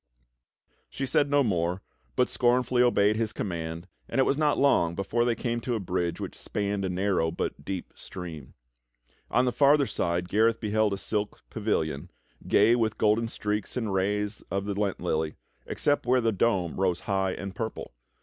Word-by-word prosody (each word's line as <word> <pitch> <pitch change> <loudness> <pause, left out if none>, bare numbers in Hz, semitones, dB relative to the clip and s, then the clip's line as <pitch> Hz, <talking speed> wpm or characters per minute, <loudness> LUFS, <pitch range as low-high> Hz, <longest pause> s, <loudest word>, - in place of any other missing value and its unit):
She 135 - -3
said 145 +2 +2
no 145 0 +4
more, 90 -4 0 0.3
but - - +3
scornfully 125 0 +2
obeyed 110 -3 +4
his 110 -1 0
command, 85 -2 -4 0.2
and - - -3
it 135 - +5
was 135 - +2
not 150 0 +2
long 85 -12 +3
before 110 +5 0
they 120 -1 +1
came 120 0 -2
to 120 0 -1
a - - -1
bridge 90 -2 -2
which - - -5
spanned 100 -1 -3
a 95 - -1
narrow 90 -2 +1
but 80 -3 -4
deep 95 +2 -5
stream. 80 -7 -8 0.7
On 125 - +3
the 125 - +2
farther 140 +2 +4
side 85 -6 -1
Gareth 110 +4 +2
beheld 110 -1 +1
a - - -2
silk 105 +1 -3
pavilion, 80 -10 -1 0.4
gay 110 +4 +5
wuth 110 -2 0
golden 110 +2 +2
streaks 105 0 -3
and 110 -5 -1
rays 105 +2 -1
of 100 0 -2
the 100 - -2
Lent 100 -1 -1
lily, 80 -3 -1 0.3
except 145 -3 0
where 130 +1 +4
the 115 -2 +2
dome 95 -5 0
rose 90 -3 +1
high 95 -1 0
and 100 -1 -6
purple. 110 - -5
105 Hz, 180 wpm, -27 LUFS, 90-120 Hz, 0.7 s, it